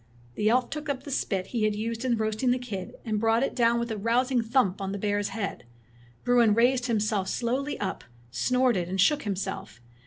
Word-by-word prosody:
The 210 - +1
elf 250 +1 +2
took 300 0 -5
up 275 -2 -2
the 285 - -7
spit 195 -8 -1
he 235 - 0
had 215 -1 +1
used 230 +2 -3
in 245 -3 +1
roasting 220 +3 0
the 250 - +3
kid, 220 -7 -6
and 215 -2 -1
brought 225 +2 +2
it - - -1
down 235 -1 +3
with 235 -1 -3
a 220 - -2
rousing 245 +3 +2
thump 225 -5 +1
on 195 0 -3
the - - -3
bear's 205 0 -1
head. 205 -3 -4 0.6
Bruin 240 -3 +4
raised 245 +2 +3
himself 210 -4 0
slowly 260 +5 -2
up, 190 -2 -3 0.3
snorted, 235 - +1
and 190 +1 -3
shook 290 +9 +4
himself. 195 - -4
230 Hz, 205 wpm, -27 LUFS, 205-250 Hz, 0.6 s, Bruin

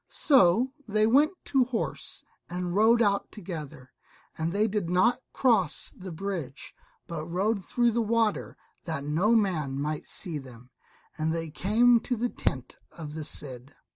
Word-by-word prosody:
So 255 - +4
they 215 0 +3
went 285 - +4
to 270 -2 +3
horse 240 -2 -4 0.3
and 175 0 -3
rode 225 +4 +5
out 200 -1 0
together, 155 - -8 0.4
and 160 +1 -2
they 205 +3 +2
did 200 -5 -2
not 235 +8 +3
cross 215 - +1
the 185 -1 -8
bridge, 165 -6 -5 0.3
but 160 -2 -5
rode 195 +4 0
through 240 +5 +2
the 235 +1 +1
water 225 -1 0 0.3
that 160 -4 -3
no 170 +10 +2
man 160 -11 0
might 150 +1 -3
see 165 -6 -2
them, 125 -2 -13 0.5
and 155 +1 0
they 165 -1 -3
came 230 +8 +4
to 245 +2 -2
the 240 +2 -1
tent 130 - -3
of 150 -3 -8
the 155 0 -5
Cid. 135 -3 -5
185 Hz, 155 wpm, -28 LUFS, 155-225 Hz, 0.5 s, rode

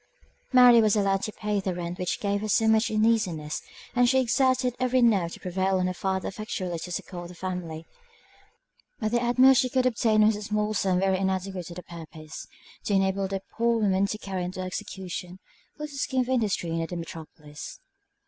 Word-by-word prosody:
Mary 250 -2 +8
was 215 -1 +3
allowed 195 -2 +2
to 215 - -3
pay 210 -1 -2
the 190 -2 -2
rent 175 0 -5
which 180 -1 -2
gave 200 -1 -1
her 215 - -3
so 220 +2 +3
much 220 +2 +3
uneasiness, 215 -9 +1 0.3
and 245 0 +4
she 265 +1 +4
exerted 255 0 +2
every 255 0 +2
nerve 200 -8 +3
to - - -9
prevail 190 +1 0
on 185 - +1
her 185 - -1
father 190 0 -2
effectually 185 -4 -4
to 180 - -7
succour 175 0 -5
the 180 - -12
family; 175 -3 -5 1.1
but 215 -3 -1
the 240 0 +2
utmost 255 +2 +6
she 255 - -1
could 255 +1 +1
obtain 220 -3 +3
was 215 0 +4
a 210 - -6
small 210 0 -1
sum 190 -3 +1
very 190 0 +1
inadequate 190 -2 -2
to 170 - -9
the 180 - -8
purpose, 160 -2 -10 0.4
to 205 - 0
enable 195 0 +1
the 195 0 -4
poor 235 0 +1
woman 200 -2 +2
to 215 - -3
carry 190 -3 -4
into 180 +1 -5
execution 185 0 -5 0.4
a 300 - -7
little 295 -2 -6
scheme 260 0 0
of 250 - -3
industry 215 -9 0
near 165 0 -1
the 175 - -6
metropolis. 155 -3 -9
195 Hz, 195 wpm, -26 LUFS, 180-225 Hz, 1.1 s, Mary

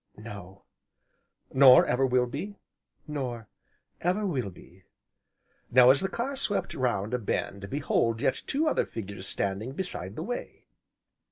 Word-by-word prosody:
"No." 100 -3 -10 0.9
"Nor 130 -1 +8
ever 130 +2 +2
will 125 -1 +3
be?" 150 +12 -6 0.5
"Nor 125 -8 -5 0.5
ever 185 +5 0
will 130 - -1
be." 90 +1 -17 0.8
Now 125 0 +7
as 140 - +2
the 190 - -1
car 255 +7 -3
swept 245 -6 -2
round 120 -4 -1
a 125 - +1
bend, 100 -2 -3
behold 115 -5 0
yet 130 - 0
two 305 +3 +1
other 300 - +1
figures 100 -3 -6
standing 100 +8 -2
beside 135 - -4
the 160 - -4
way. 245 +6 -6
125 Hz, 140 wpm, -28 LUFS, 100-155 Hz, 0.9 s, Nor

